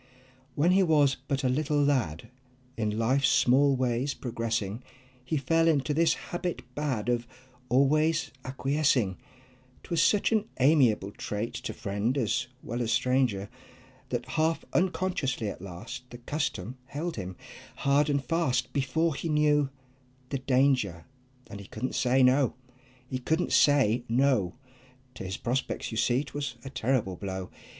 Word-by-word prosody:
When 165 Hz, +5 st, +3 dB
he 190 Hz, +1 st, +5 dB
was 150 Hz, -6 st, +4 dB
but 135 Hz, 0 st, -1 dB
a -, -, +3 dB
little 145 Hz, +3 st, +1 dB
lad, 120 Hz, -, 0 dB, 0.4 s
In 105 Hz, -1 st, -1 dB
life's 130 Hz, +4 st, +2 dB
small 135 Hz, +3 st, +4 dB
ways 130 Hz, +2 st, 0 dB
progressing, 115 Hz, -3 st, -3 dB, 0.4 s
He 140 Hz, +5 st, -1 dB
fell 165 Hz, +4 st, +2 dB
into 150 Hz, -2 st, +2 dB
this 165 Hz, +1 st, +3 dB
habit 175 Hz, 0 st, -4 dB
bad 130 Hz, -7 st, -2 dB
Of 120 Hz, -1 st, 0 dB, 0.4 s
always 155 Hz, +6 st, +2 dB
acquiescing; 135 Hz, -6 st, +1 dB, 0.7 s
'Twas 170 Hz, -2 st, 0 dB
such 210 Hz, +4 st, +3 dB
an 220 Hz, -2 st, +2 dB
amiable 125 Hz, -8 st, +4 dB
trait, 105 Hz, +2 st, -4 dB
To -, -, -5 dB
friend 105 Hz, +6 st, -1 dB
as 130 Hz, +1 st, 0 dB, 0.2 s
well 120 Hz, +2 st, -3 dB
as 115 Hz, -1 st, -1 dB
stranger, 125 Hz, -4 st, +1 dB, 0.6 s
That 120 Hz, -1 st, -2 dB
half 160 Hz, +3 st, 0 dB
unconsciously 175 Hz, -, 0 dB
at 100 Hz, -, -8 dB
last 100 Hz, +7 st, -8 dB
The 120 Hz, -, -9 dB
custom 125 Hz, -, -3 dB
held 160 Hz, +5 st, -4 dB
him 95 Hz, -3 st, -6 dB, 0.4 s
hard 140 Hz, +2 st, +2 dB
and 140 Hz, -2 st, 0 dB
fast 130 Hz, -7 st, 0 dB
Before 150 Hz, +4 st, +1 dB
he 165 Hz, +4 st, -4 dB
knew 150 Hz, -2 st, +3 dB, 0.6 s
the 135 Hz, -, -2 dB
danger, 130 Hz, -10 st, +1 dB, 0.4 s
And 100 Hz, -, -8 dB
he 100 Hz, -, -10 dB
couldn't 125 Hz, +4 st, -4 dB
say 130 Hz, 0 st, +3 dB
"No!" 130 Hz, -1 st, +4 dB, 0.5 s
He 130 Hz, 0 st, -3 dB
couldn't 160 Hz, +7 st, 0 dB
say 130 Hz, -5 st, +4 dB
"No!" 120 Hz, -7 st, +2 dB, 0.6 s
To -, -, -8 dB
his 95 Hz, 0 st, -4 dB
prospects 125 Hz, +1 st, -2 dB
you 110 Hz, -, -4 dB
see 125 Hz, +3 st, +2 dB
'twas 140 Hz, -2 st, -5 dB
a 135 Hz, -, -6 dB
terrible 115 Hz, -8 st, 0 dB
blow. 95 Hz, -1 st, -5 dB
130 Hz, 145 wpm, -28 LUFS, 115-145 Hz, 0.7 s, he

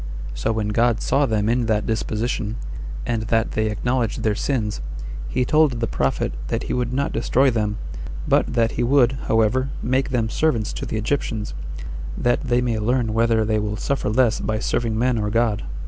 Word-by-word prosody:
So 110 Hz, -, -1 dB
when 110 Hz, -2 st, -1 dB
God 115 Hz, +1 st, +2 dB
saw 140 Hz, +1 st, +2 dB
them 110 Hz, -2 st, +1 dB
in 120 Hz, 0 st, +1 dB
that 110 Hz, -1 st, +1 dB
disposition, 110 Hz, 0 st, -1 dB, 0.5 s
and 115 Hz, -2 st, 0 dB
that 115 Hz, 0 st, +1 dB
they 110 Hz, 0 st, 0 dB
acknowledge 120 Hz, +1 st, 0 dB
their 110 Hz, -, +1 dB
sins, 105 Hz, -, -1 dB, 0.5 s
he 125 Hz, -, +1 dB
told 155 Hz, 0 st, +4 dB
the 115 Hz, -, +1 dB
prophet 65 Hz, -10 st, -1 dB
that -, -, -1 dB
he -, -, -3 dB
would 125 Hz, -1 st, -1 dB
not 140 Hz, +2 st, 0 dB
destroy 130 Hz, +3 st, +3 dB
them, 105 Hz, -2 st, -1 dB, 0.5 s
but -, -, +3 dB
that 115 Hz, -1 st, +3 dB
he -, -, -2 dB
would, 125 Hz, -1 st, +4 dB, 0.2 s
however, 115 Hz, +4 st, +2 dB
make 130 Hz, +3 st, +1 dB
them 120 Hz, -4 st, +1 dB
servants 115 Hz, -4 st, 0 dB
to -, -, -5 dB
the 110 Hz, -, -2 dB
Egyptians, 110 Hz, -2 st, -2 dB, 0.6 s
that 120 Hz, 0 st, +1 dB
they 125 Hz, -2 st, +1 dB
may 120 Hz, -3 st, 0 dB
learn 115 Hz, 0 st, +1 dB
whether 115 Hz, -1 st, +3 dB
they 110 Hz, 0 st, +1 dB
will 105 Hz, 0 st, -2 dB
suffer 140 Hz, -3 st, -1 dB
less 120 Hz, +1 st, +3 dB
by 110 Hz, -, -1 dB
serving 110 Hz, 0 st, -1 dB
men 120 Hz, 0 st, +2 dB
or 105 Hz, -1 st, 0 dB
God. 110 Hz, -1 st, +1 dB
115 Hz, 185 wpm, -22 LUFS, 110-125 Hz, 0.6 s, told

